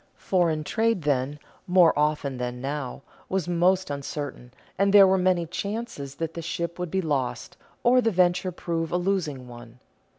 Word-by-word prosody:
Foreign 170 -5 +1
trade 225 0 0
then, 140 0 0 0.3
more 180 -2 +5
often 150 -3 0
than 125 0 -4
now, 135 0 -4 0.3
was 190 -3 -1
most 180 0 +2
uncertain, 140 -3 -5 0.2
and 195 +1 +2
there 200 -1 +9
were 190 0 +4
many 180 -2 +2
chances 200 - -5
that 165 -1 -4
the 170 - -5
ship 170 +1 -4
would 180 -1 -3
be 190 +3 -1
lost, 135 -6 -2 0.3
or 250 +1 +5
the 230 - +2
venture 180 -1 +2
prove 165 -2 -3
a 175 - +1
losing 175 -9 -2
one. 120 0 -12
170 Hz, 165 wpm, -26 LUFS, 140-185 Hz, 0.3 s, there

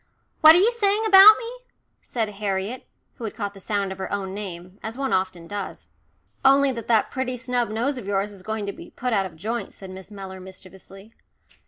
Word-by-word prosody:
"What 315 0 +9
are - - +6
you 430 +6 +4
saying 415 +1 +2
about 415 +1 +9
me?" 460 +1 -6 0.5
said 225 -3 -2
Harriet, 205 +3 -4 0.3
who - - -9
had 215 - -6
caught 205 -3 -4
the 195 - -13
sound 200 -1 -2
of 190 - -8
her 190 - -5
own 195 -2 -3
name, 185 -2 -7
as 225 +3 -6
one 270 -1 -2
often 185 -2 -1
does. 200 +2 -6 0.6
"Only 275 0 +5
that 230 -4 -7
that 225 -2 +2
pretty 260 -2 -3
snub 245 -1 -1
nose 245 +5 -1
of 205 - -10
yours 200 +1 -1
is 195 -2 -12
going 220 +1 -4
to 200 - -4
be - - -12
put 250 -1 -3
out 195 -2 +1
of 165 - -16
joint," 220 +8 -5
said 190 -1 -10
Miss 190 +1 -11
Mellor 195 -2 -9
mischievously. 190 +2 -13
210 Hz, 210 wpm, -24 LUFS, 190-250 Hz, 0.6 s, What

